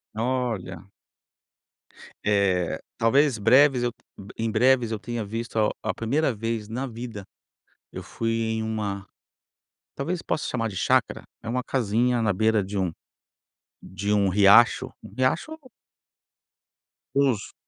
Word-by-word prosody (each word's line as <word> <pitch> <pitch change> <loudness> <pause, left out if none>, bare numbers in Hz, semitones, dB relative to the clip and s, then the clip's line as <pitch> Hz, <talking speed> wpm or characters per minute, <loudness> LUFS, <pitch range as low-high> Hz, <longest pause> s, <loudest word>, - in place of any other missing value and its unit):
Olha. 110 -6 -3 1.4
Eh, 100 -4 +1 0.2
talvez 135 +2 +3
breves 130 +4 +5
eu 120 - 0 0.5
em 115 0 -1
breves 125 +1 +3
eu 110 - -2
tenha 120 -1 -4
visto 115 +2 -5
a 105 - +3
a - - -1
primeira 135 +5 0
vez 115 -1 -3
na 125 +5 -4
vida, 115 -3 -7 0.7
eu - - -7
fui 115 0 -3
em 110 -1 -1
uma 105 -3 -3 0.9
talvez 170 +5 -3
possa 150 - -2
chamar 115 -2 -2
de 100 - -9
chácara, 130 +4 +1 0.2
é 110 - -5
uma 125 +1 -1
casinha 120 0 +1
na 105 -2 +2
beira 110 +2 +2
de 100 +2 -5
um 95 -3 0 0.9
de 100 +2 -4
um 100 -2 +3
riacho, 105 +4 +5
um - - -12
riacho 165 - 0 1.6
Os 135 -7 +1
115 Hz, 130 wpm, -25 LUFS, 105-125 Hz, 1.6 s, breves